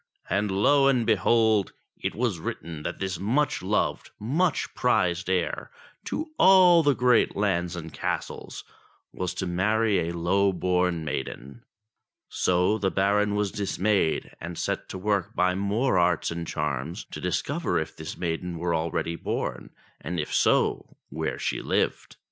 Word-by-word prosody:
And 100 +2 +1
lo 135 +9 +4
and 125 -4 +2
behold! 110 0 +3 0.2
it - - -4
was 115 -7 -1
written 80 -1 -6
that - - -4
this 95 -3 -3
much 130 +8 0
loved, 100 +3 -1
much 150 - 0
prized 90 -7 +1
heir 90 -2 -1 0.4
to 310 0 -4
all 185 -3 +7
the 145 -3 +3
great 125 -2 +3
lands 90 -4 0
and 80 -2 -7
castles - - -4 0.5
was 90 0 -3
to 95 - -2
marry 105 +4 +1
a 85 - -5
low 95 +3 +2
born 90 -2 0
maiden. 65 -2 -5 0.7
So 90 +4 +1
the 95 -1 +1
Baron 100 +2 +1
was 105 -2 0
dismayed, 100 -3 0
and 85 0 -6
set - - -3
to - - -5
work 100 -1 -1
by 90 +1 +2
more 100 +7 +1
arts 85 -1 +1
and 85 -1 -5
charms 75 - -3
to - - -7
discover - - -1
if - - -3
this - - -7
maiden 85 0 -3
were 85 +1 -1
already 85 +1 -1
born, - - -4 0.3
and 85 +1 -4
if 75 - -3
so, - - +1
where 80 +2 -3
she - - -2
lived. - - -1
95 Hz, 150 wpm, -26 LUFS, 85-110 Hz, 0.7 s, all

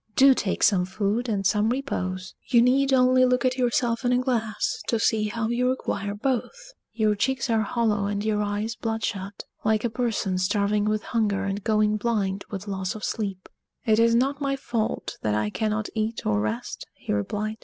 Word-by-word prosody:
Do 270 0 +7
take 205 -6 -2
some 190 -3 +4
food 210 +5 -1
and 200 -3 -1
some 210 +3 +3
repose. 185 -8 -3
You 240 - +4
need 270 +2 +3
only 255 0 +5
look 250 0 +2
at 255 0 +1
yourself 240 -1 +1
in 245 - +2
a 250 - +4
glass 235 -4 -1
to 230 - +1
see 220 -1 +2
how 225 +1 -2
you 250 +1 +1
require 205 -5 -2
both. 275 - -3 0.2
Your 215 -2 +2
cheeks 240 +3 -1
are 225 -1 +3
hollow 215 -2 0
and 205 +1 -2
your 210 -1 +1
eyes 210 +2 -2
bloodshot, 215 -4 -3 0.2
like 215 0 +2
a 235 - 0
person 220 -6 -1
starving 205 +2 +1
with 215 0 0
hunger 205 -4 0
and 200 0 -3
going 215 -1 +2
blind 200 -3 -1
with 200 0 -6
loss 190 -1 -3
of 215 - -8
sleep." 195 -4 -3 0.4
"It 220 -2 +3
is 230 0 +4
not 275 +4 +1
my 275 -1 0
fault 235 -4 -3
that 105 -1 0
I 105 0 0
cannot 215 - -1
eat 220 +1 -2
or 105 -1 +2
rest," 110 +2 -4
he - - -4
replied. 210 - -2
215 Hz, 190 wpm, -25 LUFS, 200-240 Hz, 0.4 s, Do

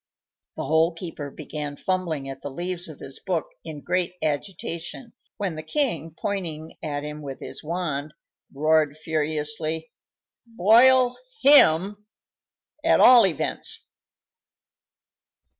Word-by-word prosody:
The - - -4
Hole 160 +2 +2
keeper 165 -4 -6
began 150 0 -5
fumbling 170 -6 -2
at 135 0 -7
the 145 - -5
leaves 175 +4 -4
of 155 -3 -10
his 135 - -10
book 175 -5 -1 0.2
in 155 -3 -8
great 180 +1 0
agitation, 170 - -4 0.2
when 195 -5 -2
the 155 - -6
king, 165 - -1
pointing 165 -6 -4
at 145 -2 -3
him 150 0 -6
with 135 -2 -7
his - - -7
wand, 155 -3 -3 0.4
roared 155 +1 +2
furiously: 155 0 -2 0.6
"Boil 245 +4 +5 0.3
him, 205 - +5 0.8
at 330 - +4
all 245 -4 +8
events!" 165 -6 -3
160 Hz, 115 wpm, -24 LUFS, 150-185 Hz, 0.8 s, all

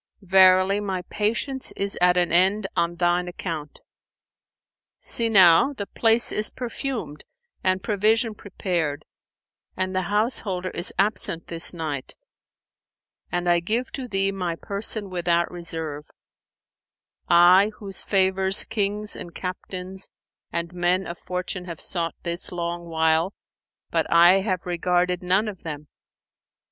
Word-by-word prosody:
Verily 190 +1 +5
my 190 -3 -3
patience 235 +5 -1
is 200 0 -2
at 180 0 +4
an 175 -1 +2
end 190 +4 +3
on 170 0 0
thine 175 +1 +1
account. 165 -4 -6 1.2
See 230 -1 +1
now, 190 +5 +6
the 205 -7 -5
place 225 +3 +4
is 210 - +2
perfumed 245 - -5 0.4
and 185 0 +1
provision 220 +2 +2
prepared 175 -7 -3 0.7
and 185 0 -2
the 185 - +1
householder 205 -4 -1
is 175 - 0
absent 195 -4 -1
this 165 0 -2
night, 155 -6 -5 1.2
and 175 0 -1
I 175 0 +4
give 225 +9 -2
to 265 -2 -5
thee 195 -2 0
my 180 -4 -3
person 200 +1 -1
without 170 -1 0
reserve, 160 -4 -6 1.2
I 180 +4 +6
whose 195 -2 -5
favours 190 0 +2
kings 210 0 -1
and 170 - -9
captains 185 +1 -5 0.4
and 170 +1 -3
men 180 +2 +1
of 170 - -7
fortune 180 0 -5
have 170 -3 -7
sought 170 -2 -3
this 170 0 -4
long 175 0 -4
while, 160 +2 +1 0.6
but - - 0
I 175 +3 +7
have 185 -3 -2
regarded 180 +1 0
none 190 +4 +1
of 200 -4 -7
them." 150 -2 -7
185 Hz, 130 wpm, -24 LUFS, 170-200 Hz, 1.2 s, I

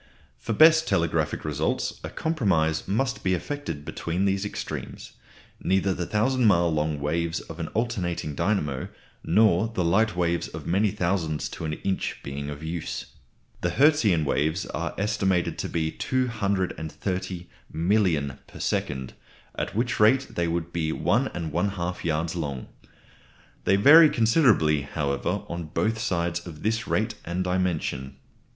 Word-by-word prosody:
For 115 - -3
best 160 +5 +6
telegraphic 80 -2 0
results 75 0 -1
a - - -4
compromise 95 - 0
must 110 +3 -1
be 95 0 +2
effected 85 - -5
between 85 +6 -2
these 95 0 +1
extremes, 105 - -6 0.5
neither 95 0 +2
the 85 -1 -4
thousand 125 +4 +1
mile 85 -4 +4
long 75 -1 0
waves 80 +3 -1
of 80 - -10
an 85 - -3
alternating 95 -10 -1
dynamo 75 -5 -1 0.4
nor 100 +2 +4
the 100 -6 -2
light 105 +5 +2
waves 85 -1 0
of - - -8
many 100 +4 +2
thousands 85 -4 -1
to - - -6
an 75 - -2
inch 95 +4 -2
being 70 +1 -5
of 75 +1 -7
use. 80 +1 -5 0.5
The 85 - +1
Hertzian 110 - +3
waves 80 +6 0
are - - -4
estimated 95 -3 0
to - - -3
be 80 -1 -1
230,000,000 90 - -1
per - - -12
second; 65 -2 -2 0.4
at - - -4
which 120 +2 0
rate 125 +6 +4
they 85 -1 -1
would 85 0 -2
be 80 -2 -1
1 - - +1
1/2 85 +2 -2
yards 80 +1 -1
long. 70 -7 -4 1.0
They 95 - +4
vary 150 +10 +8
considerably, 115 - +3
however, 70 -2 -2
on 85 -1 -5
both 110 +8 -1
sides 85 -5 -1
of 75 -3 -10
this 110 +3 0
rate 110 +2 0
and 85 +2 -2
dimension. 85 -7 -1
85 Hz, 140 wpm, -26 LUFS, 80-105 Hz, 1.0 s, vary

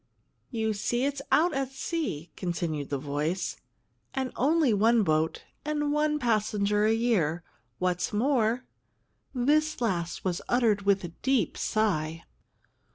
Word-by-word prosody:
"You 220 -3 -1
see, 240 +5 0
it's 280 0 -2
out 345 +3 +4
at 270 -1 -1
sea," 270 - -3
continued 165 -5 -3
the 140 - -1
voice; 150 +6 -2 0.6
"and 265 -2 -1
only 295 -2 +3
one 225 +2 +4
boat 155 -2 0 0.2
and 295 -1 -1
one 300 0 +2
passenger 210 -4 +1
a 220 - +4
year. 200 -9 +1 0.3
What's 180 -1 0
more 240 +1 +1 0.4
" - - -38 0.2
This 310 0 0
last 180 -8 -2
was 180 -2 -1
uttered 220 -5 +2
with 195 -1 +3
a 175 - -4
deep 265 +8 0
sigh. 165 -7 0
215 Hz, 135 wpm, -28 LUFS, 175-265 Hz, 0.6 s, out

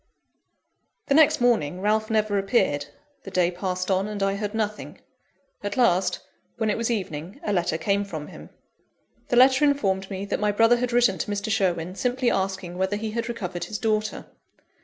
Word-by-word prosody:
The - - +4
next 310 0 +5
morning, 200 -10 +1
Ralph 215 +2 +1
never 215 -2 +1
appeared 150 - +1 0.3
the 195 - -9
day 180 -2 +2
passed 185 +1 -3
on, 190 +2 +1
and 210 -2 -3
I 195 0 +1
heard 205 +1 -4
nothing 215 -1 -3 0.6
at 205 +2 -4
last, 190 -7 +2 0.4
when 220 -2 +1
it - - -1
was 230 - -1
evening, 180 -5 -4
a 205 - -1
letter 175 -3 0
came 200 +4 0
from 160 -7 -6
him. - - -12 0.8
The - - 0
letter 260 +3 +6
informed 195 -10 +1
me 195 0 -4
that - - -2
my 210 0 +2
brother 225 +3 +4
had 250 0 -2
written 240 -5 +3
to - - -3
Mr. 205 +1 -2
Sherwin, 180 -5 0
simply 250 +3 0
asking 190 -2 -2
whether 190 +2 0
he 215 +1 -4
had 230 +1 -3
recovered 180 -7 -4
his 215 - -5
daughter. 215 -1 -1
205 Hz, 180 wpm, -25 LUFS, 185-225 Hz, 0.8 s, letter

